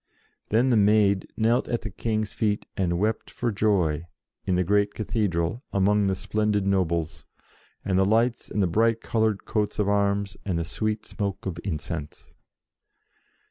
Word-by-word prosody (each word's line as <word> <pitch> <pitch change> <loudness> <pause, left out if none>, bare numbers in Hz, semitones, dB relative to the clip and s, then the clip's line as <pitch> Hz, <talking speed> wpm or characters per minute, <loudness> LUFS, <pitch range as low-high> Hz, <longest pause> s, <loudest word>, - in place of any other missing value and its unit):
Then 120 +4 +3
the 120 - +4
Maid 100 -1 +3
knelt 115 +2 +2
at 120 - -1
the 110 - -5
King's 110 +1 -2
feet 105 -2 0
and 90 -4 0
wept 110 +4 -1
for 120 -1 -2
joy, 90 -7 +1 0.4
in 95 -2 +1
the 90 - +2
great 100 +2 +1
Cathedral, 105 0 -1
among 100 +1 +2
the 95 - +1
splendid 105 +1 0
nobles, 85 -5 -1 0.6
and 95 -1 +2
the - - +5
lights, 115 +4 +1
and 105 - 0
the - - +2
bright 115 +5 +2
coloured 110 -3 0
coats 105 -2 -1
of 105 -2 +1
arms, 100 -1 +1
and 95 -4 -1
the 85 - -1
sweet 110 +5 -2
smoke 100 -2 -4
of 90 -3 -4
incense. 80 -3 -5
100 Hz, 160 wpm, -25 LUFS, 95-110 Hz, 0.6 s, the